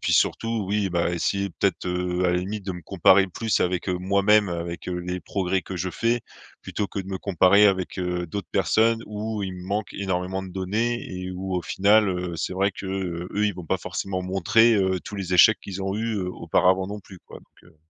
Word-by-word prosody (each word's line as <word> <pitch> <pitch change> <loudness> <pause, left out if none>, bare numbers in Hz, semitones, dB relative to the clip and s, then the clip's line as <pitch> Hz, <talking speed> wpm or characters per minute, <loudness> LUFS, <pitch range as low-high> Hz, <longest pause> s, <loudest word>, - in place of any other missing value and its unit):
puis - - 0
surtout, 115 -2 +1
oui, 100 -1 +1
bah, 85 -1 0
essayer 100 +3 -1
peut-être, 95 -2 0
heu, 90 0 -1
à - - +4
la 90 - +1
limite, 100 +3 -4
de 95 - -3
me 90 - -8
comparer 95 +2 +4
plus 110 +4 -1
avec, 90 +1 0
heu, 90 - +1
moi-même, 100 +2 +3
avec, 85 0 -5
heu, 90 -1 -2
les 90 +1 -4
progrès 95 -1 -1
que 95 - -7
je 90 +1 -2
fais 115 +5 0 0.4
plutôt 105 - -3
que 100 - -5
de 95 - -9
me 95 -1 -3
comparer 100 +2 +5
avec, 95 -3 0
heu, 90 -1 -2
d'autres 95 -2 -5
personnes 110 +5 +2
où 105 0 -4
il 95 -1 -4
me 90 0 -9
manque 100 0 -2
énormément 95 -1 -2
de 95 - -9
données 110 +6 -1
et 90 0 -5
où, 95 +1 -4
au 90 - -2
final, 105 +2 +3
heu, 90 -2 -3
c'est - - -3
vrai 95 +2 +1
que 95 0 -8
eux, 95 +1 -2
ils 105 - +1
vont 90 -2 -9
pas - - +1
forcément 95 -1 -4
montrer, 95 +5 +3
heu, 95 -2 +1
tous 105 - -7
les 95 -2 -2
échecs 110 +4 +7
qu'ils 95 -1 -6
ont 95 +1 -2
eu 110 -1 -1
auparavant 95 +1 +1
non 105 +1 -6
plus, 95 -1 -14
quoi, - - -11
donc, - - -25
heu 80 - -26
95 Hz, 225 wpm, -24 LUFS, 90-100 Hz, 0.4 s, échecs